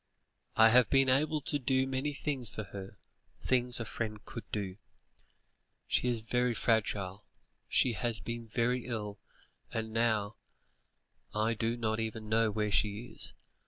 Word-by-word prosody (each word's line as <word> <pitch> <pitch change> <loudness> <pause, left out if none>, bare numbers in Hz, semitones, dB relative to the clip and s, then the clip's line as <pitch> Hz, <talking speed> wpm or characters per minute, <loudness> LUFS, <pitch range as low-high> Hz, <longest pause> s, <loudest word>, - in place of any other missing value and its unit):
I 110 0 +8
have 125 +1 +5
been 135 -1 +4
able 150 +4 +2
to 145 +2 -2
do 130 0 +2
many 135 +2 -1
things 135 -4 -3
for 110 - -5
her; 100 -1 -9 0.4
things 125 -1 +2
a 115 - -3
friend 105 -1 -4
could 115 - -8
do. 100 -3 -3 1.1
She - - +1
is 120 -2 0
very 125 +1 +1
fragile; 105 -4 0 0.4
she 125 - +3
has 120 0 -2
been 115 -1 -5
very 120 +2 0
ill, 105 -4 -4 0.5
and 110 -1 -3
now 110 -2 +1 1.0
I 110 +2 +2
do 115 +2 -1
not 110 -1 -1
even 110 -1 -4
know 110 0 +3
where 105 0 -1
she 105 +4 +2
is. - - +4
115 Hz, 150 wpm, -32 LUFS, 110-125 Hz, 1.1 s, I